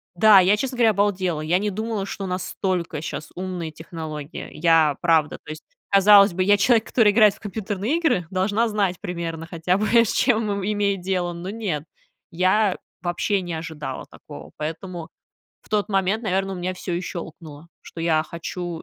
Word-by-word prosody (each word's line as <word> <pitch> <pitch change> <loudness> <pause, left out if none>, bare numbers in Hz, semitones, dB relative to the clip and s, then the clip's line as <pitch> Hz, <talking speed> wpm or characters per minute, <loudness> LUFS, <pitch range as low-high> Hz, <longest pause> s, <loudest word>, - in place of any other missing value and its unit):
да, 205 +1 +7
я, 195 +3 +4
честно 255 +2 -3
говоря, 230 -2 +5
обалдела. 190 -5 0
Я 165 +4 +1
не 210 +1 -1
думала, 215 0 -3
что 195 -1 -5
настолько 180 -3 -3
щас 155 -1 -6
умные 180 -3 -4
технологии. 155 -1 -7
Я, 160 -3 +3
правда, 160 -3 +2
то - - -12
есть, 155 0 -7 0.3
казалось 200 0 +7
бы, 185 +1 -1
я 205 +2 +4
человек, 225 +2 +3
который 215 -4 +3
играет 210 -2 +5
в - - -20
компьютерные 210 - -2
игры, 245 - +1
должна 205 +5 +1
знать 200 -4 0
примерно 170 -3 -5
хотя 170 +2 0
бы, 215 - 0
с 230 -2 +4
чем 225 -4 +2
им 200 -1 -3
имеет 205 -1 0
дело. 180 -2 -1
Но 170 +2 -6
нет, 195 -9 -3 0.5
я 185 +4 +2 0.2
вообще 180 +3 -1
не 175 -2 -5
ожидала 160 -2 -6
такого. - - -12
Поэтому 165 +2 -6 0.5
в - - -23
тот 210 0 0
момент, 195 +3 0
наверно, 195 -1 -1
у - - -5
меня 180 +1 -3
всё 180 -1 -4
и 175 - -1
щёлкнуло, 165 -3 -8 0.2
что 165 - -10
я 160 -2 +2
хочу 170 +1 -6
185 Hz, 180 wpm, -23 LUFS, 170-205 Hz, 0.5 s, да